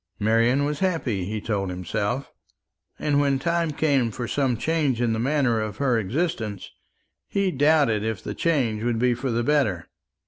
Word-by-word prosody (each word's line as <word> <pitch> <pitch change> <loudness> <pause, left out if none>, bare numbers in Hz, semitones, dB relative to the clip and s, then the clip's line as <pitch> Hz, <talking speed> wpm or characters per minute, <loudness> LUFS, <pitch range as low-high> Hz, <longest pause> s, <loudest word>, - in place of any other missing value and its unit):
Marian 115 +6 +2
was 150 0 -2
happy, 150 - -1
he 105 +3 -3
told 100 -3 -2
himself; 105 +8 -3 0.7
and 145 -1 +1
when 140 -1 +2
time 170 +3 0
came 145 -5 +1
for 120 +2 -5
some 130 -1 0
change 150 -3 0
in 120 -2 +1
the 110 - -2
manner 130 -2 +1
of 105 -2 -4
her 125 -3 +2
existence, 110 - -3 0.6
he 200 -2 0
doubted 145 -7 +3
if 110 -3 -3
the - - -4
change 125 -10 0
would 120 0 0
be 125 +1 +2
for 125 +3 -3
the 120 0 0
better. 115 - +1
125 Hz, 170 wpm, -24 LUFS, 110-145 Hz, 0.7 s, doubted